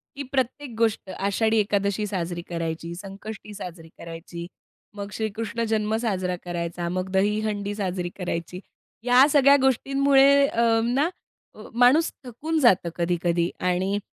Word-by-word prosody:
की 280 - -4
प्रत्येक 270 +1 -1
गोष्ट 225 -4 0
आषाढी 220 +4 0
एकादशी 200 0 0
साजरी 175 -3 -3
करायची, 165 0 -4
संकष्टी 200 +3 -9
साजरी 175 -5 -9
करायची, 170 +1 -8 0.5
मग 200 0 -5
श्रीकृष्ण 225 +1 -3
जन्म 215 0 +1
साजरा 185 -6 -1
करायचा, 170 0 -3
मग 185 +1 -3
दहीहंडी 205 +1 0
साजरी 185 -3 -2
करायची. 180 -1 -4 0.4
या 250 +2 +6
सगळ्या 280 -1 +7
गोष्टींमुळे 275 +1 +4
अ, 235 -3 0 0.2
ना 265 +7 +1 0.6
माणूस 250 +7 +4
थकून 310 +7 -2
जातो 195 - +4
कधी-कधी 170 0 0
आणि 185 +3 0
205 Hz, 125 wpm, -25 LUFS, 180-240 Hz, 0.6 s, सगळ्या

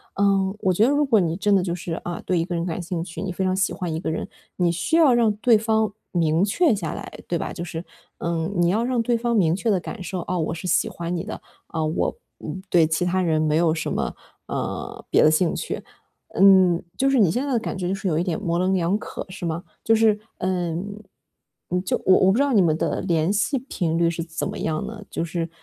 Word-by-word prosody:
嗯， 195 0 +2
我 190 - +2
觉 205 +5 +3
得 275 - +3
如 290 +1 +3
果 235 -7 +4
你 165 -2 0
真 205 +1 +2
的 185 - +3
就 170 -2 -2
是， 175 -1 -5
啊， 175 -1 -4
对 180 - 0
一 165 - +1
个 180 - -5
人 170 0 -1
感 170 0 -3
兴 170 -1 -3
趣， 170 - -9
你 190 - -3
非 190 +2 -2
常 185 0 +1
喜 190 - +1
欢 175 -3 -4
一 160 - -2
个 160 - -2
人， 165 - -3 0.3
你 175 -2 +2
需 170 - -1
要 310 -6 +6
让 230 -3 +4
对 225 0 +5
方 220 -1 +1 0.2
明 165 +1 +2
确 255 - +3
下 170 -6 -4
来， - - -8
对 170 -2 -1
吧？ - - -4
就 175 - -5
是， 170 0 -5 0.4
嗯， 170 +3 -2
你 175 0 +3
要 220 +5 +1
让 250 -2 +1
对 235 0 +1
方 235 0 0
明 170 -5 +3
确 220 +2 0
地 190 - +2
感 190 +2 -7
受， 180 +1 -4
哦， 180 - -1
我 160 0 -1
是 170 +2 -6
喜 - - +2
欢 170 +1 -4
你 170 - -3
的， - - -7 0.3
呃， 160 -1 0
我 155 - -1 0.5
对 170 -3 +5
其 160 +2 0
他 185 +1 +1
人 160 -2 +1
没 155 -1 +1
有 165 -2 +3
什 160 - -3
么， - - -1 0.4
嗯， - - -4
别 - - +4
的 155 - +6
兴 165 +2 +2
趣。 - - -4 0.5
嗯， 190 -3 +6
就 270 +1 +2
是 270 - +3
你 190 -8 +5
现 250 +7 -1
在 280 - -2
的 - - +3
感 225 - -3
觉 180 -1 -3
就 190 - 0
是 195 0 -4
有 155 -3 +1
一 - - +1
点 175 -4 -2
模 170 0 -1
棱 185 +1 +1
两 175 +2 +1
可， - - -7
是 185 -1 -6
吗？ 165 +3 -3 0.2
就 225 - +4
是， 220 -1 +3 0.2
呃， 175 -3 -1 1.1
就 - - -1
我 185 - +6
我 190 0 +5
不 215 - +1
知 280 - +4
道 280 -3 +1
你 200 - +5
们 160 -2 +2
的 - - -1
联 170 +1 +1
系 270 +6 +1
频 175 - -2
率 170 0 +3
是 165 0 -4
怎 160 -1 -4
么 - - -5
样 155 -1 -2
呢？ 215 -2 -7
就 165 - -2
是， 165 0 -3
180 Hz, 275 characters per minute, -23 LUFS, 165-205 Hz, 1.1 s, 要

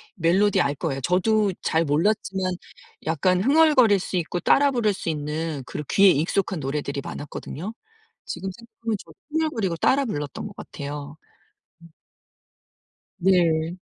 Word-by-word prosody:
멜로디 190 +2 +3
알 140 -4 +1
거예요. 135 -2 -3
저도 200 - +2
잘 165 +1 +1
몰랐지만 190 +4 0 0.5
약간 180 +4 +2
흥얼거릴 265 -5 +5
수 185 - -3
있고 175 +1 -2
따라 280 +9 +4
부를 230 -5 +1
수 190 - -4
있는 150 -1 -3
그런 150 - -5
귀에 200 0 +6
익숙한 175 +3 +1
노래들이 140 0 -3
많았거든요. 160 +7 -6 0.5
지금 190 - -4
생각하면 230 +1 -5
저도 - - -16 0.2
흥얼거리고 245 - 0
따라 275 +10 +3
불렀던 145 - -4
것 200 - -12
같아요. 145 +1 -7 0.6
음. 170 - -14 1.3
네. 170 -2 +2
180 Hz, 300 characters per minute, -24 LUFS, 155-210 Hz, 1.3 s, 귀에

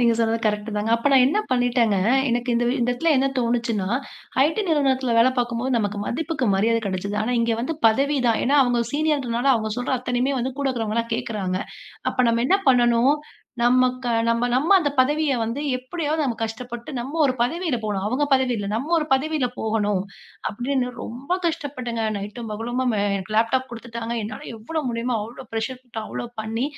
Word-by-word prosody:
நீங்க 235 -1 +4
சொன்னது 230 0 +1
கரெக்ட்டுதாங்க 210 0 -1
அப்ப 235 +5 +1
நான் 260 -2 +7
என்ன 300 +10 +1
பண்ணிட்டேங்க, 245 -4 +2 0.3
எனக்கு 245 +1 0
இந்த 235 +1 +2
வி 245 - +1
இடத்துல 245 +7 +1
என்ன 265 +1 +3
தோணுச்சுன்னா 235 -5 0 0.6
IT 310 +2 0
நிறுவனத்துல 265 -5 +2
வேலை 235 +3 +6
பார்க்கும்போது 240 +1 -1
நமக்கு 205 -1 -2
மதிப்பிற்கு 305 -1 -2
மரியாதை 225 +4 +2
கிடைக்குது. 200 +2 -3
ஆனா 245 +3 0
இங்க 230 0 +1
வந்து 260 +7 -2
பதவி 275 +6 +1
தான். 225 - +2
ஏன்னா 280 +3 +3
அவுங்க 245 -2 +1
சீனியர்ன்றதுனால 275 -4 +1
அவுங்க 220 -2 -1
சொல்ற 245 +2 -2
அத்தனையுமே 250 +2 0
வந்து 255 +2 -2
கூட 280 - 0
இருக்கிறவங்க 225 -4 -2
எல்லாம் 230 0 -2
கேக்குறாங்க. 210 -6 -2 0.5
அப்ப - - -11
நம்ம 230 0 +2
என்ன 385 +7 +4
பண்ணணும்? 240 +2 +4 0.5
நமக்கு 255 0 +2 0.2
நம்ம, 230 +1 +2
நம்ம 305 +10 +4
அந்த 295 -4 0
பதவிய 295 +3 +3
வந்து 230 +5 -2 0.2
எப்பிடியாவது 305 +4 -2
நம்ம 245 -4 -1
கஷ்டப்பட்டு 235 +2 -5
நம்ம 270 +7 -4
ஒரு 270 - +3
பதவியில 315 +3 0
போணும். 200 -2 -2
அவுங்க 255 +7 +1
பதவி 260 -2 +3
இல்ல. 205 -2 -3
நம்ம 275 +9 -2
ஒரு 305 - -2
பதவியில 285 0 +1
போகணும் 210 -3 0 0.5
அப்பிடின்னு 250 +3 -1
ரொம்ப 270 +10 -3
கஷ்டப்பட்டேங்க. 270 -8 -3
நைட்டும் 210 +3 -6
பகலுமா 240 +4 -2 0.2
அ - - +1 0.3
லேப்டாப் 255 +4 +2
கொடுத்துட்டாங்க. 235 0 -5
என்னால 215 +1 -7
எவ்வளவு 290 +7 -4
முடியுமோ! 235 +1 -1
அவ்ளோ 240 +4 -10
ப்ரஷர் 225 +3 -3
போட்டு 235 -3 -7
அவளோ 240 - -5 0.2
பண்ணி 225 +3 -2
245 Hz, 175 wpm, -23 LUFS, 230-265 Hz, 0.6 s, நான்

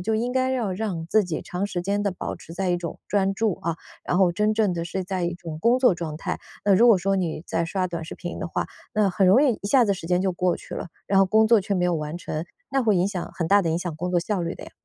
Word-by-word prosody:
就 220 +4 0
应 240 +3 -1
该 260 0 +1
要 235 -7 -1
让 180 -5 -3
自 210 +3 +3
己 170 -3 -3
长 180 +2 -3
时 180 -3 -3
间 200 +3 -1
地 200 - +1
保 180 - -5
持 - - -12
在 185 +2 -2
一 175 - +2
种 170 -2 -6
专 195 -1 +2
注， 210 -2 0
啊， 165 -1 -1 0.3
然 180 - 0
后 185 -2 +5
真 210 +4 +1
正 210 -4 +1
地 170 0 -3
是 185 +2 -3
在 185 -2 -2
一 175 - -1
种 165 -3 -7
工 235 +2 +4
作 250 -8 +4
状 160 -3 -5
态。 - - -3 0.3
那 200 - +6
如 235 +5 +6
果 215 -5 +6
说 195 +2 +1
你 170 -4 -2
在 165 - 0
刷 185 +2 -1
短 170 -2 -5
视 - - -7
频 175 -1 -6
的 185 - -3
话， - - -2 0.3
那 210 -2 +3
很 190 +1 +2
容 200 +8 +6
易 255 -7 +2
一 200 - -3
下 255 -1 +5
子 200 -2 +1
时 165 -2 -8
间 180 0 +2
就 190 -1 +1
过 180 0 +1
去 - - -9
了， - - -5 0.2
然 195 0 +4
后 - - +6
工 220 +3 +4
作 225 -2 +5
却 200 - -3
没 180 -1 +1
有 175 -1 +2
完 155 +2 -4
成， 155 -1 -4 0.3
那 270 -1 +2
会 215 -4 +3
影 180 +2 +2
响 190 -4 -4
很 165 - -2
大 200 +2 +5
地 165 - 0
影 165 - 0
响 175 -3 -4
工 180 +3 -3
作 175 - +3
效 185 +1 -1
率 170 +2 -3
的 - - -9
呀。 - - -12
185 Hz, 325 characters per minute, -24 LUFS, 175-205 Hz, 0.3 s, 那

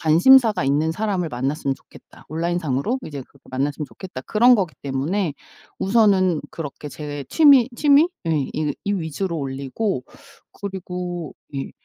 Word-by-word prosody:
관심사가 210 - +5
있는 150 +4 +1
사람을 195 -3 -1
만났으면 135 +3 -1
좋겠다. - - -18
온라인 170 +3 -1
상으로 160 - -1
이제 145 -3 -6
그렇게 140 +2 -24
만났으면 140 +3 -2
좋겠다.' 185 -9 -9
그런 240 +3 +5
거기 185 -7 -1
때문에 145 +6 -1 0.5
우선은 190 -5 +3
그렇게 150 -2 -7
제 145 -2 -6
취미 280 -6 +6
취미? 295 +4 +5 0.2
예. 165 - +1 0.2
이 150 -2 -1
이 200 - 0
위주로 170 0 -2
올리고 135 - -3 0.5
그리고 180 -4 -5 0.2
예. 135 - -4
170 Hz, 330 characters per minute, -22 LUFS, 145-200 Hz, 0.5 s, 취미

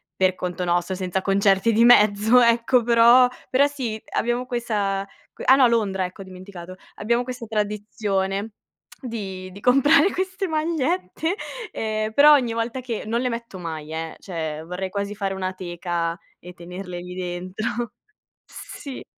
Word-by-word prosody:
per 185 -1 +2
conto 180 0 -4
nostro, 175 +2 0
senza 185 0 -2
concerti 195 +3 +2
di 225 +2 +4
mezzo, 215 0 +6
ecco, 235 +1 +3
però 235 +2 +6 0.2
però 270 +2 +4
sì, 245 -7 -5
abbiamo 240 +2 -1
questa 210 -6 -1 0.3
que - - -9
ah 265 - +7
no, 265 -2 +6
Londra, 205 -5 0
ecco, 180 +2 -9
ho - - -6
dimenticato. 185 -1 -10 0.2
Abbiamo 235 +3 0
questa 245 -2 -7
tradizione 205 -1 -2 0.5
di 195 -7 -6
di 195 - -11
comprare 290 - +5
queste 375 +1 -2
magliette, 310 - -1 0.4
ehm, 215 0 -2
però 295 +4 +8
ogni 250 -5 +2
volta 230 +3 -3
che 235 -3 -4
non 230 +2 0
le 255 - 0
metto 230 -4 -6
mai, 160 -3 -6
eh, 160 0 -5
cioè 160 -4 -5
vorrei 180 +3 -5
quasi 200 +1 -3
fare 195 -1 -2
una 185 -1 -3
teca 175 -2 -3 0.2
e 180 +1 -11
tenerle 180 +1 -8
lì 180 +1 -8
dentro 185 +6 -4 0.5
sì. 275 -3 -9
210 Hz, 155 wpm, -23 LUFS, 185-240 Hz, 0.5 s, però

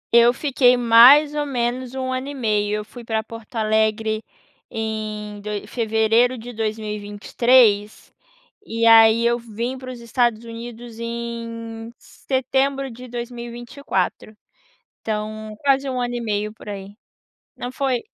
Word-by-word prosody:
Eu 235 0 +7
fiquei, 250 -2 +3
mais 245 +6 +7
ou 295 0 -1
menos, 255 -1 -2
1 260 -1 -2
ano 255 +1 -3
e 285 - -6
meio. 210 -4 0
Eu 210 0 -4
fui 240 +3 -12
para 220 -1 -2
Porto 230 +1 -12
Alegre 220 0 +1 0.5
em 215 -2 -5
doi 210 0 -5
fevereiro 225 +2 +2
de 245 +2 -9
2023, 215 +1 +1 0.5
e 230 - -2
aí 225 0 +7
eu 235 0 +2
vim 235 +2 -4
para 255 0 -8
os 245 - -9
Estados 235 -1 0
Unidos 230 0 -9
em 230 -1 -6
setembro 270 +1 -1
de 250 +2 -10
2024. 235 -3 -4 0.6
Então 215 0 -4
quase 275 -1 +2
1 255 -1 -2
ano 245 0 -2
e 240 - -3
meio, 210 -1 -2
por 220 - -15
aí. 200 -1 -7 0.6
Não 245 - -6
foi 260 -2 0
230 Hz, 135 wpm, -22 LUFS, 215-250 Hz, 0.6 s, Eu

